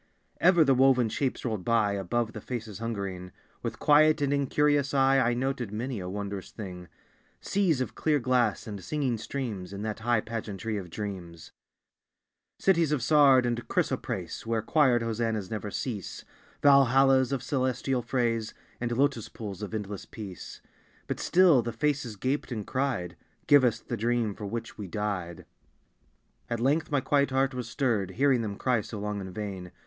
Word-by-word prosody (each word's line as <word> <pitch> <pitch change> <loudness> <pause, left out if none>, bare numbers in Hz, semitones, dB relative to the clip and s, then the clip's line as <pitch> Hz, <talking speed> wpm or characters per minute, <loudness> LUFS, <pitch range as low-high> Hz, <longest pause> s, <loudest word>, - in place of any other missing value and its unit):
Ever 175 -2 +6
the 135 -2 +4
woven 130 -2 +4
shapes 130 +4 -2
rolled 110 -6 -2
by 115 -2 +2
Above 110 +4 -1
the 110 - -7
faces 110 -5 -6
hungering. 100 -5 -4 0.3
With - - -4
quiet 155 +1 +5
and 140 -1 +1
incurious 145 0 +1
eye 135 0 +4
I 120 -2 +2
noted 125 -3 -2
many 120 +2 -3
a 90 -1 -5
wondrous 100 0 -5
thing, 90 -5 -8 0.5
Seas 180 -9 +1
of 130 - -3
clear 155 -2 +1
glass, 125 -4 +1
and 100 -4 -7
singing 130 - -1
streams, 110 -6 -5
In 100 +1 -6
that 110 0 -3
high 115 0 +1
pageantry 110 -2 -4
of 95 -3 -6
dreams; 90 -4 -7 1.1
Cities 170 -5 +2
of 145 -6 0
sard 140 -3 +5
and 120 -1 -2
chrysoprase - - -2
Where 115 -1 -1
choired 130 -4 +3
Hosannas 115 -3 -2
never 105 -1 -3
cease; 105 -2 -5 0.4
Valhallas 135 -1 +5
of 135 -2 -2
celestial 130 0 0
frays, 115 -2 -1 0.2
And 120 -1 -2
lotus 130 -2 +1
pools 105 -3 -7
of 105 - -5
endless 105 -2 -5
peace; 100 -5 -9 0.4
But - - -4
still 175 -7 +5
the 120 +1 -4
faces 135 -2 -1
gaped 130 +6 -2
and 110 -4 -4
cried 130 -10 -2 0.3
"Give 145 -2 +6
us 120 -2 +2
the - - -5
dream 115 -1 0
for 105 0 -7
which 115 +1 -6
we 100 - -5
died!" 90 -4 -4 1.0
At 115 - -2
length 145 +6 +1
my 145 -2 +1
quiet 140 +1 +2
heart 135 +1 +1
was 125 -2 -5
stirred, 110 -7 0
Hearing 135 -2 +3
them 105 -3 -3
cry 125 +1 +1
so 105 - -8
long 105 0 -3
in 95 -1 -7
vain. 95 -3 -6
120 Hz, 165 wpm, -28 LUFS, 105-135 Hz, 1.1 s, Ever